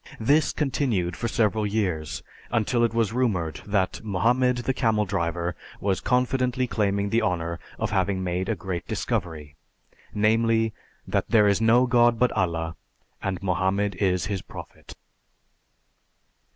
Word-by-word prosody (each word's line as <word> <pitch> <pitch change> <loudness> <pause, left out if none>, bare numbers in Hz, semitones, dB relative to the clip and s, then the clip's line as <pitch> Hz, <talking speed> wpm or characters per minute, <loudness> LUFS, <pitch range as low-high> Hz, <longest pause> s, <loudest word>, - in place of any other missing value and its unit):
This 145 +7 +3
continued 120 - -1
for 115 - -2
several 110 -2 +1
years 95 -8 -2 0.3
until 120 +1 +1
it 115 - +2
was 115 -2 0
rumored 100 -11 -1
that 100 -1 0
Mohammed, 120 +6 +2
the 130 - +1
camel 110 -4 +1
driver, 85 -2 -2 0.2
was 95 -2 0
confidently 125 0 +1
claiming 100 -3 0
the 115 - +3
honor 85 -1 -1 0.2
of 105 -1 -2
having 95 -1 0
made 90 +1 -2
a 115 - +1
great 85 -1 -5
discovery; 75 -3 -3 0.5
namely, 110 +1 +2 0.3
that - - -1
"There 105 -2 +5
is 100 +2 +2
no 115 +3 +5
God 120 -1 +4
but 125 +2 +3
Allah, 85 -2 -1 0.5
and 95 -1 -3
Mohammed 95 +2 0
is 90 -3 +1
His 100 -3 -3
Prophet." - - -11
105 Hz, 140 wpm, -25 LUFS, 90-115 Hz, 0.5 s, There